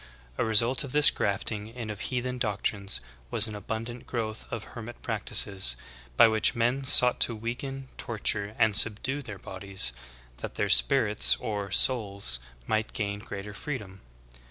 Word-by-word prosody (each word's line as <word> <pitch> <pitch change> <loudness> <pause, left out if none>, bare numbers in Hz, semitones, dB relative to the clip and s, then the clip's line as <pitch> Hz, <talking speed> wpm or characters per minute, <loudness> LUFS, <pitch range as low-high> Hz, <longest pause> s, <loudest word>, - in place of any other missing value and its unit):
A - - +2
result 115 +4 +3
of 140 - -4
this 150 0 +8
grafting 105 +1 -2
in 115 -1 -7
of 105 - -8
heathen 125 +1 -3
doctrines 100 - -1 0.3
was 105 - +2
an 110 - -7
abundant 115 +3 -6
growth 110 -3 -4
of 115 -2 -4
hermit 120 0 -9
practices, 95 -12 +1 0.4
by - - +8
which 110 -1 +3
men 120 +4 0
sought 125 -2 +6
to 115 - +1
weaken, 130 +5 -5
torture, 105 -2 -1
and 110 -2 +3
subdue 115 +6 +1
their 105 -7 -8
bodies, 95 -9 -2 0.4
that - - -7
their - - -1
spirits - - +4
or 100 -2 -4
"souls" 100 - +2 0.3
might 110 +5 -1
gain 100 -1 -3
greater 105 -1 -8
freedom. 105 -6 -7
110 Hz, 150 wpm, -27 LUFS, 100-120 Hz, 0.4 s, this